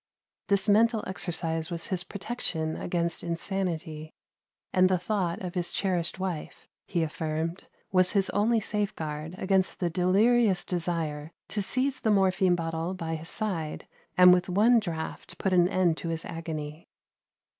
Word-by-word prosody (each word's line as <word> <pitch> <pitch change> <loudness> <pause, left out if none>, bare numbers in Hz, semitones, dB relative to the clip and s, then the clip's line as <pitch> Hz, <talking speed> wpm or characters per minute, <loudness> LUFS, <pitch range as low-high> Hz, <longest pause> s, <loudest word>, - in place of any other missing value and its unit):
This 200 -1 +2
mental 220 +2 +4
exercise 165 -3 -2
was 170 -2 -3
his 185 -3 0
protection 180 -7 -3
against 170 -1 -2
insanity: 170 -3 -3 0.6
and 185 0 +5
the 185 - +3
thought 180 -2 -1
of 180 -1 -4
his 180 -2 -1
cherished 180 -4 -1
wife, 185 -5 -5 0.2
he 170 -2 0
affirmed, 160 +2 -3 0.2
was 185 -1 +4
his 195 -2 +2
only 225 +3 +2
safeguard 165 -7 -3
against 190 -1 +1
the 175 -2 0
delirious 195 +3 +3
desire 165 -4 -2 0.2
to 210 - -1
seize 260 +6 +1
the 220 - 0
morphine 190 -2 +3
bottle 165 +1 -3
by 165 -3 -4
his 160 +1 -4
side, 175 -9 -3 0.3
and 180 0 +9
with 180 +1 +1
one 220 +6 +5
draught 170 -1 -6
put 190 +1 0
an 175 0 +5
end 175 -4 +2
to 170 - -4
his 165 0 -3
agony. 160 -2 -6
180 Hz, 145 wpm, -28 LUFS, 165-195 Hz, 0.6 s, and